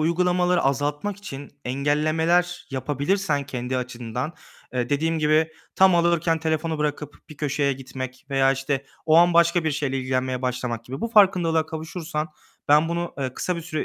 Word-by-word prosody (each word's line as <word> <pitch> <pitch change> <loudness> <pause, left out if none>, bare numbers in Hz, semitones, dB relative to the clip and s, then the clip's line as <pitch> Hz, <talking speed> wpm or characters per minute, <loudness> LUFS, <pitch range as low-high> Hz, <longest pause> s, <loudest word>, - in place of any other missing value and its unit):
uygulamaları 180 +2 +2
azaltmak 145 +8 -1
için 145 -9 -8
engellemeler 155 +6 +1
yapabilirsen 145 +4 0
kendi 130 -2 -3
açından. 125 +3 -4 0.4
Eee, 125 -1 -1
dediğim 160 +4 0
gibi, 155 +1 +2 0.2
tam 190 -1 +6
alıyorken 170 -1 +2
telefonu 160 0 -1
bırakıp 150 -1 -3
bir 155 - -11
köşeye 140 -1 0
gitmek 130 0 -7
veya 135 0 +4
işte 135 0 -2 0.2
o 155 - +5
an 175 0 +6
başka 170 0 +4
bir 155 - +2
şeyle 140 -2 -1
ilgilenmeye 130 0 -1
başlamak 125 -2 -2
gibi, 130 +3 -7
bu 230 - -1
farkındalığa 180 -7 +4
kavuşursan, 160 0 -4 0.4
ben 150 +2 +5
bunu, 170 0 -3
ııı, 130 -2 -3
kısa 180 -1 -2
bir 170 - -5
süre 155 -2 -3
150 Hz, 155 wpm, -24 LUFS, 135-170 Hz, 0.4 s, tam